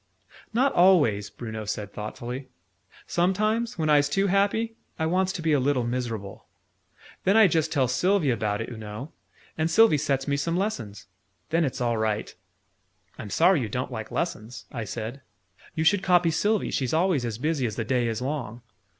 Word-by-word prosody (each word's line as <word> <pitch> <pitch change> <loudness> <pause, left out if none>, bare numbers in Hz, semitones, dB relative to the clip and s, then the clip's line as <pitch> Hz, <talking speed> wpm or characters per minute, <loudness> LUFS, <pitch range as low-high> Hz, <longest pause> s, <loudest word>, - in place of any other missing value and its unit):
"Not 265 +4 +2
always," 150 - +4
Bruno 110 -2 -6
said 105 -1 -4
thoughtfully. 120 +5 -6 0.6
"Sometimes, 215 +6 0
when 160 -2 0
I's 145 -1 +4
too 195 +7 +1
happy, 200 +4 +1 0.2
I 160 - -1
wants 185 +3 +1
to 175 -5 -5
be 160 -2 +2
a 145 - +4
little 130 -1 +1
miserable. 115 -5 -4 0.8
Then 195 +3 +4
I 220 - +8
just 160 -3 +1
tell 135 -4 +2
Sylvie 155 +4 +2
about 105 -2 -1
it, 115 - -5
oo 120 - -7
know, 110 +7 -7 0.5
and 160 +1 +1
Sylvie 195 -3 +5
sets 135 -1 -1
me 140 0 +1
some 165 +5 -1
lessons. 120 - -3 0.5
Then 165 +1 +3
it's 130 -3 -2
all 120 -2 +1
right." 110 -1 -1 0.9
"I'm 105 - -6
sorry 170 - +4
you 110 - -3
don't 125 +5 -3
like 110 -3 -5
lessons," 120 -8 -4
I 115 -4 -4
said. 115 +6 -6 0.5
"You 160 - 0
should 185 +4 +4
copy 175 -3 +3
Sylvie. 210 +6 +1
She's 130 +2 -1
always 170 -5 +2
as 115 -3 -3
busy 145 -1 0
as 105 - -5
the 115 - -3
day 125 0 +1
is 115 +1 -2
long!" 125 -5 -4
140 Hz, 180 wpm, -26 LUFS, 115-175 Hz, 0.9 s, I